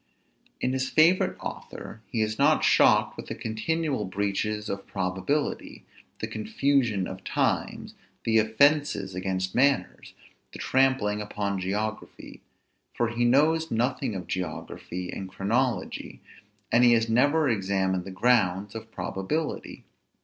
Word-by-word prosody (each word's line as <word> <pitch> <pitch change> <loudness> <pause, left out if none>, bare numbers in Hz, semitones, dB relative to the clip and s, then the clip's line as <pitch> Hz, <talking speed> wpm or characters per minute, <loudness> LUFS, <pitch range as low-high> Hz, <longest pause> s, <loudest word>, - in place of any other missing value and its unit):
In 125 - 0
his 130 -1 -1
favorite 165 +4 +4
author 110 - -8
he 110 -2 0
is 110 0 -3
not 150 +2 +4
shocked - - +4
with - - -8
the - - -5
continual 135 +4 -2
breaches 105 +2 -2
of 100 -1 -5
probability, 95 +11 -2 0.4
the - - 0
confusion 115 -2 0
of 95 0 -8
times, - - -1 0.3
the 110 -1 +3
offences 110 -3 +2
against 95 0 -2
manners, 140 +2 +1 0.4
the - - -7
trampling 130 -6 +1
upon 100 -1 -3
geography; 105 +4 -4 0.5
for 120 -1 +1
he 120 +1 0
knows 160 +6 +3
nothing 120 -1 -1
of 90 -2 -5
geography 90 +1 -5
and 95 -1 -6
chronology, 110 +2 -2 0.5
and 120 +1 +5
he 120 -1 +7
has 115 -1 +2
never 145 +7 +3
examined 95 -4 0
the 95 - -8
grounds 100 -1 +1
of 110 0 -8
probability. 150 +15 -4
110 Hz, 130 wpm, -27 LUFS, 95-130 Hz, 0.5 s, he